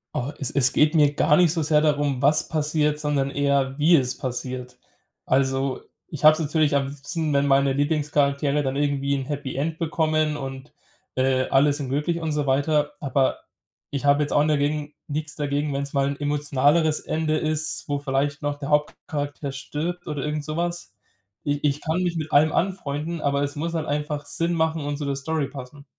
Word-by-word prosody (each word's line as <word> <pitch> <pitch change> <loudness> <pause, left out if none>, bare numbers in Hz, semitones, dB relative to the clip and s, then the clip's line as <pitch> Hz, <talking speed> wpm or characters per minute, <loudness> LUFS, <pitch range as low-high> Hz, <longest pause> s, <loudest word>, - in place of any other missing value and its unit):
Oh, 125 +4 -2
es 140 - -2
es 130 -2 +2
geht 155 +2 +3
mir 145 -2 +4
gar 150 0 +3
nicht 175 -3 +4
so 165 - -1
sehr 150 0 +3
darum, 145 -3 +1
was 150 +2 +3
passiert, 150 -1 0
sondern 145 -2 0
eher, 140 -1 0
wie 165 +3 +5
es 130 -3 +1
passiert. 125 0 -5 0.5
Also, 135 0 +1 0.3
ich 155 -1 -8
habe 155 0 +9
es 155 - -5
natürlich 155 -1 +1
am 140 -1 +1
liebsten, 150 +3 -3
wenn 140 0 +2
meine 135 -1 +3
Lieblingscharaktere 145 -1 +1
dann 135 0 -2
irgendwie 140 -1 0
'n 135 -2 -1
Happy 140 -3 -4
End 160 +4 -2
bekommen 155 -2 0
und, 135 0 -7 0.4
äh, 130 0 +2
alle 140 +2 +4
sind 140 -3 -4
glücklich 150 +5 -1
und 160 -1 -2
so 150 -2 -1
weiter. 145 +2 +1
Aber 135 -1 +1 0.5
ich 140 0 -3
habe 145 +1 +4
jetzt 145 - -4
auch 145 - +4
ni 150 - +2
dagegen 145 +1 -1
nix 155 +1 -4
dagegen, 145 0 -1
wenn's 140 +1 -3
mal 140 0 +2
'n 140 0 -3
emotionaleres 145 +2 +2
Ende 155 -1 -1
ist, 155 0 -1
wo 145 -1 -1
vielleicht 140 +1 -1
noch 145 0 -2
der 145 0 -6
Hauptcharakter 145 -1 -2
stirbt 165 +6 -5
oder 150 -2 -3
irgend 150 0 -2
sowas. 170 +3 -3 0.5
Ich 145 0 -1
ich 145 0 +1
kann 165 +2 -1
mich 175 -2 -1
mit 155 0 -4
allem 155 +2 +5
anfreunden, 165 -3 -2
aber 140 0 +1
es 145 +1 -3
muss 165 +3 -3
halt 155 -1 -1
einfach 150 0 -2
Sinn 170 +3 -1
machen 160 -1 0
und 145 0 -3
zu 145 - -4
der 140 -1 -1
Story 145 0 -2
passen. 140 +1 -10
145 Hz, 195 wpm, -24 LUFS, 140-155 Hz, 0.5 s, habe